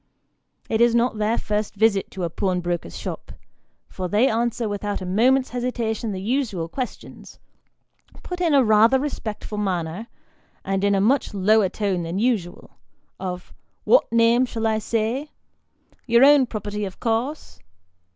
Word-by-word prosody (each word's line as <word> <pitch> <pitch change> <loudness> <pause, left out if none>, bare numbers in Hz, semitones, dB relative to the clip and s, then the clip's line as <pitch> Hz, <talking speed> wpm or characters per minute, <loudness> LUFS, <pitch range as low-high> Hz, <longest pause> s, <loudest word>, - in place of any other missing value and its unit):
It 220 0 0
is 235 0 +4
not 235 -2 +1
their 215 +2 +1
first 210 0 -2
visit 205 -2 +2
to 190 - -6
a 170 - -1
pawnbroker's 175 - -2
shop, - - -7 0.5
for 185 - -5
they 210 +8 +3
answer 235 0 -1
without 205 0 -3
a 185 - -6
moment's 250 +8 +2
hesitation 240 -2 -2
the 190 - -4
usual 210 -5 -2
questions, 255 +9 -7 0.9
put 360 0 -6
in 330 -4 +3
a 275 - +5
rather 225 +3 +5
respectful 220 -6 -5
manner 185 +1 -3 0.6
and 195 0 -1
in 200 0 +3
a 195 - +2
much 240 +1 +1
lower 205 +1 +3
tone 195 -3 -2
than 170 +2 -4
usual, 210 -6 -2 0.4
of 180 -1 -6 0.2
" - - -46
What - - +3
name 230 +2 +4
shall 225 -2 -4
I 220 -1 +1
say? 230 +6 -2 0.8
Your 235 +2 +6
own 285 -2 +6
property, 210 -2 -5
of 190 -2 -6
course 245 +6 -2
220 Hz, 150 wpm, -23 LUFS, 195-240 Hz, 0.9 s, Your